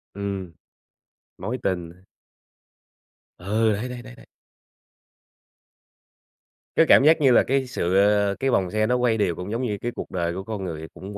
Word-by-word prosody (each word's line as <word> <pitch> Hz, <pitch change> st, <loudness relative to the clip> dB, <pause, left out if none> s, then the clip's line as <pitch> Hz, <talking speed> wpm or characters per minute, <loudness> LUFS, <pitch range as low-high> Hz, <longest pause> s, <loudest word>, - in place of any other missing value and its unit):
Ừm. 100 Hz, -3 st, -4 dB, 0.9 s
Mối 125 Hz, +3 st, -4 dB
tình 90 Hz, -3 st, -2 dB, 1.5 s
Ừ, 110 Hz, +4 st, +1 dB
đấy, 110 Hz, +5 st, -4 dB
đấy, 125 Hz, -1 st, -7 dB
đấy, 125 Hz, 0 st, -12 dB
đấy. -, -, -17 dB, 2.5 s
Cái 165 Hz, -, +5 dB
cảm -, -, +7 dB
giác 155 Hz, +2 st, +5 dB
như 135 Hz, -3 st, +5 dB
là 120 Hz, -, +5 dB
cái 135 Hz, 0 st, 0 dB
sự, 95 Hz, -8 st, -1 dB
ờ, 100 Hz, 0 st, +3 dB
cái 135 Hz, -, 0 dB
vòng 95 Hz, -7 st, +1 dB
xe 110 Hz, 0 st, +1 dB
nó 125 Hz, -, +2 dB
quay 125 Hz, -2 st, +1 dB
đều, 90 Hz, -5 st, 0 dB
cũng 90 Hz, +4 st, -7 dB
giống 115 Hz, +3 st, -2 dB
như 110 Hz, -5 st, -2 dB
cái 120 Hz, -, -2 dB
cuộc -, -, -7 dB
đời 85 Hz, -2 st, -2 dB
của 95 Hz, +2 st, -5 dB
con 105 Hz, -1 st, -5 dB
người, 80 Hz, -2 st, -6 dB
cũng 100 Hz, +2 st, -9 dB
105 Hz, 170 wpm, -24 LUFS, 95-125 Hz, 2.5 s, cảm